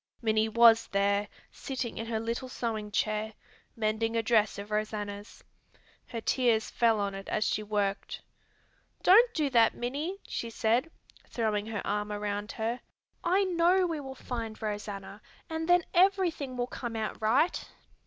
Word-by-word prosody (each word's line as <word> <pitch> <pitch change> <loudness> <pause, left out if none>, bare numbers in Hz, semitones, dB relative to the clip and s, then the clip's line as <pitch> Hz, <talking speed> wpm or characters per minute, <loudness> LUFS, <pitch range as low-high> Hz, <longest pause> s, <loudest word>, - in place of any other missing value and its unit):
Minnie 220 -1 +1
was 230 0 +6
there 200 +1 +1 0.2
sitting 255 -5 -5
in 225 - -4
her 225 -1 -1
little 235 +3 -3
sewing 220 -4 -3
chair, 215 +1 -1 0.4
mending 225 +1 0
a 230 - +1
dress 220 -2 +2
of 200 +1 -8
Rosanna's. 210 -1 -4 0.6
Her 230 - -5
tears 235 -3 +1
fell 230 -2 +3
on 200 -1 -1
it 195 0 -7
as 215 - +1
she - - 0
worked. 205 -2 -2 0.8
"Don't 460 +6 +7
do 305 -3 +1
that, 230 -3 +4
Minnie!" 290 +10 -3
she 235 - -4
said, 230 +6 +1 0.4
throwing 215 -3 -1
her 220 -3 -4
arm 210 +1 -1
around 205 0 -3
her. 230 +2 -2 0.4
"I 375 +3 +3
know 365 0 +3
we 330 -3 -2
will 265 -2 -7
find 230 -4 -5
Rosanna, 205 -1 -5 0.3
and 320 +1 -3
then 355 0 +5
everything 350 -8 +2
will 245 - 0
come 240 -1 -6
out 220 -1 -3
right." 260 +11 +2
225 Hz, 155 wpm, -29 LUFS, 210-260 Hz, 0.8 s, Don't